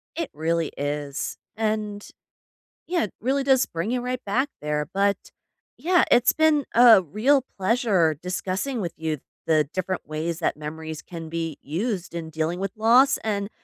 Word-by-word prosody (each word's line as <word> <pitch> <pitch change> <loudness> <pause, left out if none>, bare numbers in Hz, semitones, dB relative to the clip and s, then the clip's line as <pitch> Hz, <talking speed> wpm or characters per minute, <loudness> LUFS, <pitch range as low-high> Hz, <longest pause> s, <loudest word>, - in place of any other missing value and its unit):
It 330 -2 -3
really 165 +1 -1
is. 145 0 -3 0.2
And, 215 -2 -2 0.8
yeah, 350 0 +1
it 210 - -7
really 270 +4 0
does 265 -2 +4
bring 170 +6 -3
you 250 0 0
right 250 0 -3
back 250 +8 +1
there. 150 0 -2
But, 200 +1 +2 0.6
yeah, 360 +1 +3
it's 245 +1 +5
been 315 -2 +3
a 235 -4 +8
real 240 - +2
pleasure 195 - +2
discussing 190 +7 -2
with 175 -4 -3
you 160 -1 -2 0.3
the 155 -3 +3
different 185 -2 -3
ways 160 +2 -3
that 170 - 0
memories 155 +1 -6
can 165 -2 -8
be 165 -2 -4
used 185 - -3
in 165 -1 -5
dealing 160 +2 -2
with 195 -1 -2
loss 240 +5 +5
and 205 -2 -2
190 Hz, 160 wpm, -24 LUFS, 160-240 Hz, 0.8 s, a